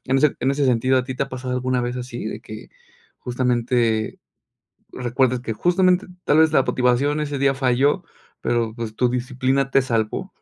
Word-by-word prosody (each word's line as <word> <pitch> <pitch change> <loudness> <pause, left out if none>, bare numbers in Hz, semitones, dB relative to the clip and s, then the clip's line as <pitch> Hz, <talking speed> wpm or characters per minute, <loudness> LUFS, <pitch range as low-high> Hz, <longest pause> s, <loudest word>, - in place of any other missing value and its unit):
en 135 - +2
ese 150 0 +2
en 130 - +1
ese 140 +1 0
sentido, 130 +1 +2
¿a 125 - -1
ti 130 - -5
te 130 - -1
ha - - -14
pasado 130 -1 -5
alguna 125 0 0
vez 120 +1 -3
así 125 -2 -6
de 110 - -5
que 110 0 -10 0.5
justamente, 120 -3 0 0.7
recuerdes 125 +1 0
que 115 -2 -3
justamente 180 - +2 0.2
tal 150 - +4
vez 160 -1 +5
la 135 - +4
motivación 130 +5 +1
ese 145 -2 -3
día 135 0 +3
falló? 135 +6 +2 0.4
Pero, 115 -2 0
pues, 115 -2 -6
tu 125 - +2
disciplina 130 +2 -1
te 135 - +4
salvó, 115 -4 -2
130 Hz, 185 wpm, -22 LUFS, 120-135 Hz, 0.7 s, vez